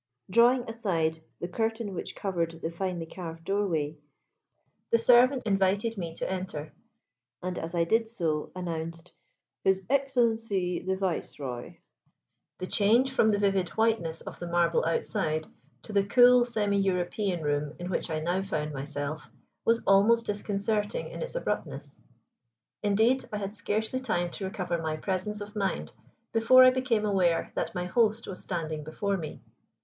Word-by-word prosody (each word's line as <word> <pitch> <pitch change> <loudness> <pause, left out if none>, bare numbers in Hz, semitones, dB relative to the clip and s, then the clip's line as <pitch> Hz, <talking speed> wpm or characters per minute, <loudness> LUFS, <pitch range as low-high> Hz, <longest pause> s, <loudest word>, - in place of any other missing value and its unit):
Drawing 240 +4 +5
aside 175 -9 -1 0.2
the 175 - -3
curtain 225 +2 -2
which 180 - -5
covered 170 -4 -2
the 165 - -3
finely 175 -1 -3
carved 165 -1 -8
doorway, 165 -6 -1 0.9
the 230 - +5
servant 250 +3 +5
invited 200 +2 +1
me 170 -5 -5
to - - -3
enter, 185 -5 -4 0.7
and 180 -1 -3
as 165 +2 -5
I 170 - +3
did 225 +6 +1
so 160 -9 -2
announced 165 -1 -5 0.5
"His 190 -1 +2
Excellency 225 -9 +1
the 190 0 -2
Viceroy." 145 -9 -4 0.8
The 185 - -4
change 225 +7 +3
from 225 -4 +3
the 205 - +3
vivid 195 -3 +1
whiteness 220 -8 +1
of - - -9
the 175 - -5
marble 170 -1 +2
outside 155 -1 -1 0.4
to 215 - -9
the 200 -1 +4
cool 245 +4 +6
semi 210 -4 0
European 185 -1 0
room 145 0 -1
in 175 - -6
which 175 - -2
I 155 -1 -2
now 175 +4 0
found 155 -6 -3
myself 145 +2 -5 0.4
was 230 0 +3
almost 210 +4 +5
disconcerting 205 +1 -1
in - - -7
its - - -5
abruptness. - - -4 0.8
Indeed, 220 +6 +3
I 210 - -2
had 200 0 -5
scarcely 220 +4 -1
time 175 -9 -1
to 195 - -5
recover 180 -4 -2
my 155 -1 -2
presence 195 +5 -3
of 205 +1 -8
mind 195 -3 -2 0.4
before 230 +3 +7
I 255 - +8
became 250 -4 0
aware 185 -5 +2
that - - -3
my 180 0 -2
host 220 +3 +2
was 185 - -7
standing 155 -4 -3
before 200 +6 -2
me. 155 -4 -7
195 Hz, 155 wpm, -28 LUFS, 165-220 Hz, 0.9 s, I